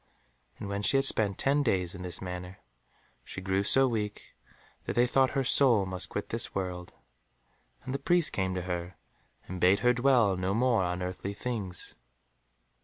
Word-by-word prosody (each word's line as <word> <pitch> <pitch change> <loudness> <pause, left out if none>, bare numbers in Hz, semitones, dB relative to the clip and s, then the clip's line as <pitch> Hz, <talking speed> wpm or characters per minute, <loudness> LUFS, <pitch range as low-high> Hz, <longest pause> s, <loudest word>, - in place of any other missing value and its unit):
And - - -6
when 100 0 -3
she 135 - +4
had 135 - +2
spent 105 -6 +1
ten 140 +2 +2
days 95 -9 0
in 95 - -8
this 90 0 -7
manner, 90 0 -6 0.7
she - - -8
grew 95 0 0
so 135 +6 +4
weak 105 -4 -4 0.5
that - - -3
they 120 - +4
thought 130 +1 +3
her 135 - +2
soul 125 -6 +4
must 95 -1 -5
quit - - -4
this - - -5
world, 90 -2 -4 0.9
and 130 - -5
the 140 - -2
priest 175 +3 +2
came 95 -1 -1
to 90 - -3
her, 90 0 -4 0.5
and 90 -1 -6
bade 95 +3 +4
her 125 0 +4
dwell 120 -5 +3
no 95 +2 -1
more 120 -2 +2
on 90 0 -2
earthly 95 +2 -5
things. 105 -7 -4
100 Hz, 180 wpm, -29 LUFS, 90-125 Hz, 0.9 s, she